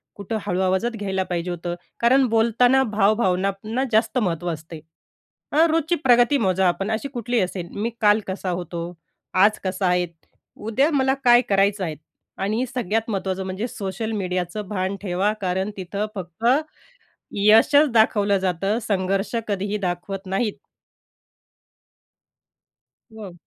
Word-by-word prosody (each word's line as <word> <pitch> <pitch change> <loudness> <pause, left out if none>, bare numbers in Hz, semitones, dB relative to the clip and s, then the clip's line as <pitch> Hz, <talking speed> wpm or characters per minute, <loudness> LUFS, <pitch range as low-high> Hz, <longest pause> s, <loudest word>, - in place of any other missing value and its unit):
कुठं 205 +2 -4
हळू 180 - -1
आवाजात 190 +5 +1
घ्यायला 190 -2 -1
पाहिजे 180 -1 -3
होतं. 175 0 -4 0.2
कारण 260 +3 +4
बोलताना 235 +4 +3
भाव 215 -3 +2
भावनांना 195 +4 -1
जास्त 225 +3 +2
महत्त्व 175 -6 -1
असते. 160 +1 -9 0.7
अ, 315 +3 +5
रोजची 325 +1 +1
प्रगती 245 +2 +5
मोजा 190 -4 +2
आपण 195 +4 -1
अशी 220 +5 -2
कुठली 240 -1 -1
असेल, 180 -1 -3
मी 225 +3 0
काल 210 0 +5
कसा 190 0 -4
होतो, 175 -1 -4 0.5
आज 205 +3 +4
कसा 185 0 -1
आहे, 180 0 +2 0.5
उद्या 240 +8 +1
मला 265 -2 +2
काय 240 0 +7
करायचं 195 0 +2
आहे 160 -3 -3 0.5
आणि 215 +6 0
सगळ्यात 225 -1 -1
महत्त्वाचं 190 -1 -2
म्हणजे 190 +5 -3
सोशल 205 0 -4
मीडियाचं 185 0 -3
भान 190 -1 -2
ठेवा, 195 +1 0
कारण 190 +2 -1
तिथं 195 +3 -3
फक्त 185 +3 -7 0.9
यशच 225 +8 +5
दाखवलं 205 -3 +3
जातं. 190 +3 -1
संघर्ष 195 +1 -1
कधीही 200 0 -1
दाखवत 190 +1 -4
नाहीत. 195 +3 -1 2.6
हो. 200 -5 -8
200 Hz, 135 wpm, -23 LUFS, 185-225 Hz, 2.6 s, काय